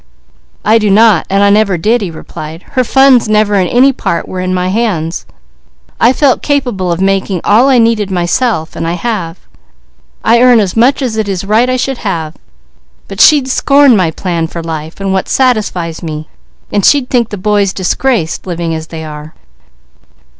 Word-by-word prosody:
"I 220 Hz, +2 st, +4 dB
do 210 Hz, -1 st, 0 dB
not, 210 Hz, -3 st, +3 dB
and 195 Hz, +1 st, +2 dB
I 200 Hz, -, +4 dB
never 205 Hz, -3 st, +2 dB
did," 220 Hz, +8 st, +1 dB
he 195 Hz, -, -3 dB
replied. 160 Hz, 0 st, -9 dB
"Her 255 Hz, -2 st, +1 dB
funds 265 Hz, -2 st, +3 dB
never 210 Hz, -1 st, +2 dB
in 190 Hz, -3 st, +2 dB
any 265 Hz, +6 st, +3 dB
part 170 Hz, -, -3 dB
were 185 Hz, -, -6 dB
in 185 Hz, 0 st, -2 dB
my 185 Hz, 0 st, -1 dB
hands. 185 Hz, -6 st, -2 dB, 0.7 s
I 235 Hz, -, +4 dB
felt 265 Hz, -1 st, +1 dB
capable 245 Hz, -11 st, -1 dB
of 170 Hz, -, -2 dB
making 195 Hz, -1 st, 0 dB
all 235 Hz, +6 st, +3 dB
I 260 Hz, -, +4 dB
needed 225 Hz, -3 st, +1 dB
myself, 175 Hz, 0 st, -1 dB
and 165 Hz, -, -4 dB
I 170 Hz, -, -1 dB
have. 180 Hz, -4 st, -4 dB, 0.9 s
I 235 Hz, +1 st, +3 dB
earn 250 Hz, -2 st, +5 dB
as 195 Hz, -4 st, -1 dB
much 255 Hz, +5 st, +2 dB
as 230 Hz, -4 st, -3 dB
it 215 Hz, -2 st, -2 dB
is 190 Hz, 0 st, -3 dB
right 220 Hz, +5 st, +2 dB
I 255 Hz, -, 0 dB
should 260 Hz, 0 st, -3 dB
have; 165 Hz, -6 st, -4 dB, 0.7 s
but -, -, -3 dB
she'd 290 Hz, -4 st, +5 dB
scorn 275 Hz, 0 st, +3 dB
my 185 Hz, -5 st, +1 dB
plan 165 Hz, 0 st, -3 dB
for 170 Hz, 0 st, -7 dB
life 160 Hz, 0 st, -6 dB
and 195 Hz, -1 st, -2 dB
what 190 Hz, -, -2 dB
satisfies 205 Hz, -10 st, -1 dB
me; 155 Hz, -2 st, -6 dB, 0.4 s
and 205 Hz, -, 0 dB
she'd 275 Hz, +1 st, +2 dB
think 235 Hz, -3 st, +1 dB
the 205 Hz, -, -6 dB
boys 205 Hz, 0 st, 0 dB
disgraced, 190 Hz, -1 st, -2 dB
living 170 Hz, -2 st, -3 dB
as 160 Hz, 0 st, -5 dB
they 160 Hz, -1 st, -8 dB
are." 150 Hz, 0 st, -10 dB
200 Hz, 185 wpm, -11 LUFS, 175-240 Hz, 0.9 s, earn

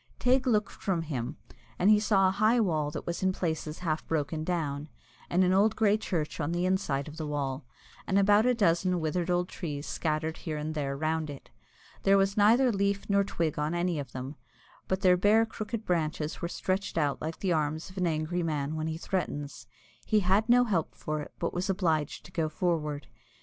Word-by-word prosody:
Teig 260 Hz, +1 st, +2 dB
looked 210 Hz, -4 st, +2 dB
from 180 Hz, -4 st, -2 dB
him, 140 Hz, -2 st, -4 dB, 0.4 s
and 195 Hz, +4 st, +4 dB
he 210 Hz, -, +6 dB
saw 200 Hz, -3 st, +3 dB
a -, -, +2 dB
high 215 Hz, +5 st, +3 dB
wall 155 Hz, -8 st, +1 dB
that -, -, -6 dB
was 170 Hz, -, -3 dB
in 190 Hz, 0 st, +2 dB
places 160 Hz, -4 st, -3 dB
half 155 Hz, -1 st, 0 dB
broken 155 Hz, 0 st, -1 dB
down, 155 Hz, -4 st, -2 dB, 0.4 s
and 180 Hz, +2 st, +3 dB
an 185 Hz, 0 st, +3 dB
old 200 Hz, +3 st, +4 dB
grey 210 Hz, -2 st, +3 dB
church 175 Hz, -9 st, -3 dB
on 150 Hz, +1 st, -1 dB
the 175 Hz, +1 st, 0 dB
inside 160 Hz, -7 st, 0 dB
of 150 Hz, +1 st, -9 dB
the 155 Hz, -2 st, -4 dB
wall, 140 Hz, -2 st, -3 dB, 0.4 s
and 195 Hz, -, +2 dB
about 205 Hz, +3 st, +5 dB
a 250 Hz, -, +3 dB
dozen 180 Hz, -3 st, +2 dB
withered 170 Hz, +2 st, -1 dB
old 180 Hz, 0 st, +1 dB
trees 150 Hz, -5 st, -5 dB
scattered 160 Hz, 0 st, -2 dB
here 155 Hz, -2 st, -4 dB
and 150 Hz, +1 st, -3 dB
there 140 Hz, -3 st, -2 dB
round 155 Hz, +1 st, -1 dB
it. 140 Hz, -2 st, -10 dB, 0.5 s
There 195 Hz, 0 st, +5 dB
was 195 Hz, 0 st, +2 dB
neither 235 Hz, +5 st, +5 dB
leaf 200 Hz, -1 st, 0 dB
nor 200 Hz, 0 st, +4 dB
twig 165 Hz, -6 st, -2 dB
on 150 Hz, +3 st, -1 dB
any 175 Hz, -2 st, 0 dB
of 135 Hz, -4 st, -6 dB
them, 130 Hz, +4 st, -6 dB, 0.5 s
but 190 Hz, 0 st, -1 dB
their 180 Hz, -2 st, +5 dB
bare 210 Hz, +4 st, +4 dB
crooked 220 Hz, 0 st, -5 dB
branches 155 Hz, -3 st, -1 dB
were 170 Hz, -, -1 dB
stretched 185 Hz, +1 st, -2 dB
out 145 Hz, -3 st, 0 dB
like 160 Hz, +1 st, -4 dB
the 185 Hz, -3 st, 0 dB
arms 155 Hz, +2 st, -1 dB
of 190 Hz, -, -16 dB
an 180 Hz, -, +2 dB
angry 160 Hz, +2 st, -1 dB
man 150 Hz, -2 st, -2 dB
when 155 Hz, 0 st, -2 dB
he 160 Hz, 0 st, -3 dB
threatens. 145 Hz, -9 st, -4 dB, 0.4 s
He 215 Hz, -1 st, +2 dB
had 200 Hz, +5 st, +2 dB
no 245 Hz, +1 st, +6 dB
help 190 Hz, -9 st, -1 dB
for 155 Hz, 0 st, -3 dB
it, -, -, -9 dB
but 170 Hz, -, -2 dB
was 180 Hz, +3 st, -2 dB
obliged 165 Hz, -6 st, 0 dB
to 180 Hz, -, -13 dB
go 165 Hz, -3 st, -1 dB
forward. 150 Hz, -4 st, -1 dB
170 Hz, 205 wpm, -29 LUFS, 155-195 Hz, 0.5 s, he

